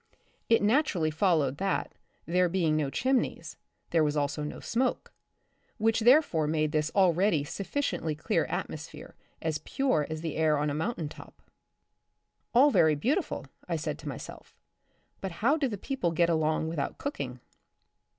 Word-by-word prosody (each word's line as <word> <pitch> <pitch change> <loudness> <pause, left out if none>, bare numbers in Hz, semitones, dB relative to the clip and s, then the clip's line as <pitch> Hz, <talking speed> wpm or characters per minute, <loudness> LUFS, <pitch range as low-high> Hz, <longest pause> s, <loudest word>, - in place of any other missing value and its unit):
It 230 -2 +4
naturally 210 - +2
followed 155 -5 +2
that, 195 +2 -1 0.3
there 180 +1 +2
being 165 -4 +1
no 150 -3 0
chimneys, 260 - -1 0.4
there 165 -2 +4
was 150 0 0
also 145 +1 -1
no 150 - -5
smoke, 250 +2 -1 0.6
which 225 0 +2
therefore 230 - +4
made 155 0 0
this 150 0 0
already 185 -4 +3
sufficiently 190 - -2
clear 155 - 0
atmosphere - - -6 0.3
as 160 -2 -1
pure 255 - 0
as 155 0 -4
the 160 -2 -4
air 155 -1 +3
on 150 0 0
a - - -2
mountain 160 +1 -2
top. - - -13 1.1
All 270 +5 +6
very 160 - +4
beautiful, 275 - -1 0.2
I - - 0
said - - -3
to - - -6
myself, - - -9 0.6
but 190 -2 -5
how 235 - +2
do 295 -4 0
the 210 -4 -4
people 230 -4 -2
get 170 +1 +2
along 160 0 +1
without 160 -4 -3
cooking 135 - -5
165 Hz, 150 wpm, -29 LUFS, 155-225 Hz, 1.1 s, All